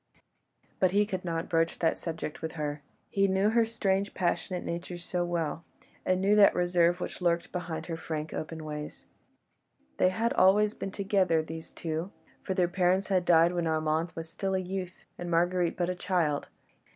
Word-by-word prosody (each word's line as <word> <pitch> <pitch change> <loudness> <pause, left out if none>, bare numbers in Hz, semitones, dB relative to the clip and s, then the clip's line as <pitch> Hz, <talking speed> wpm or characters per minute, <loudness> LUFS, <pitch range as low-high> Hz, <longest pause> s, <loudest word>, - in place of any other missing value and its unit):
But 185 - +4
he 205 +3 +3
could 185 -3 -4
not 165 -1 -2
broach 165 0 +1
that 165 - +2
subject 160 -2 -5
with 160 - -4
her. 150 -2 -3 0.3
He 195 0 +3
knew 195 +2 +2
her 230 0 +4
strange, 200 -3 -1
passionate 180 0 -1
nature 175 +1 -4
so 175 +1 -2
well, 170 -2 -2 0.4
and 185 0 +1
knew 200 +2 +3
that 205 - +7
reserve 175 0 +3
which 180 - -5
lurked 170 -1 +1
behind 165 -3 -4
her 165 - -4
frank, 155 -1 -5
open 160 0 -5
ways. 150 0 -6 0.9
They 185 - +4
had 225 +5 0
always 205 +3 +4
been 195 - -5
together, 190 -5 +2
these 160 +1 -8
two, 165 +3 -4 0.3
for 190 - -3
their 180 -2 +3
parents 185 +2 +1
had 185 -2 +2
died 170 0 +5
when 170 -2 0
Armand 160 +1 0
was 165 0 -5
still 190 +3 -2
a - - +1
youth, 185 -1 -5
and 175 0 -4
Marguerite 175 +1 +1
but 175 - 0
a 180 - 0
child. 175 -5 0
175 Hz, 180 wpm, -29 LUFS, 165-190 Hz, 0.9 s, that